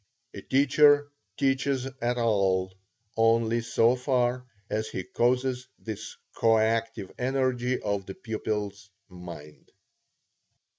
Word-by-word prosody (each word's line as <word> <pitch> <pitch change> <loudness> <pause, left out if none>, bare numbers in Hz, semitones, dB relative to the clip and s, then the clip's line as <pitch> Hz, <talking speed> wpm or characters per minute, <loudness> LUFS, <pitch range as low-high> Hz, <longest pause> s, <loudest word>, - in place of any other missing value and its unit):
A 100 - -8
teacher 145 +3 +4 0.3
teaches 135 -1 +1 0.2
at 120 +1 0
all, 95 -5 +1 0.4
only 115 +1 +3
so 115 +1 +3
far 125 -1 0 0.2
as 110 +1 -2
he 95 - -4
causes 125 +3 0
this 110 -1 -7 0.2
coactive 115 -2 +1
energy 130 -1 0
of 100 -2 -3
the 95 - -7
pupil's 105 -3 -4 0.2
mind. 85 -5 -11
115 Hz, 100 wpm, -27 LUFS, 105-125 Hz, 0.4 s, teacher